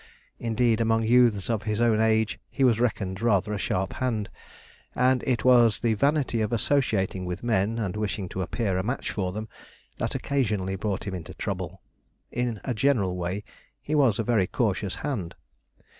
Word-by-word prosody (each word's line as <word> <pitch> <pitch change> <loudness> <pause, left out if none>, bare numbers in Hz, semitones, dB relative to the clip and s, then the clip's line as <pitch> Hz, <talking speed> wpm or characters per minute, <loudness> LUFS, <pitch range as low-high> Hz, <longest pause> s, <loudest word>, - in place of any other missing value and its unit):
Indeed, 115 0 +1
among 115 0 +2
youths 115 -4 +4
of 115 -3 0
his 105 0 -2
own 115 -2 +3
age 110 -1 +2
he 135 - -1
was 120 -3 +4
reckoned 100 -5 -1
rather 105 -3 +2
a 105 - -2
sharp 95 0 -1
hand; 115 -5 -2 0.6
and 125 0 +3
it 125 -2 0
was 120 -3 +5
the 115 -2 +2
vanity 140 -1 +1
of 110 - -1
associating 110 -6 +1
with 90 +2 -5
men, 110 -1 +1
and 105 -5 -2
wishing 105 -2 -2
to 95 - -4
appear 95 0 -1
a - - -1
match 125 +6 -2
for 95 -3 -2
them, 110 +3 -5 0.5
that - - -2
occasionally 105 -9 -1
brought 100 0 -2
him 100 - -4
into 85 -5 -7
trouble. - - -5 0.5
In 120 -3 -2
a 125 - -1
general 110 -7 +1
way, 90 +3 -3 0.4
he 150 - -5
was 135 -9 +4
a 115 - 0
very 110 -5 +2
cautious 100 -4 -1
hand. 110 - -3
110 Hz, 175 wpm, -26 LUFS, 95-120 Hz, 0.6 s, was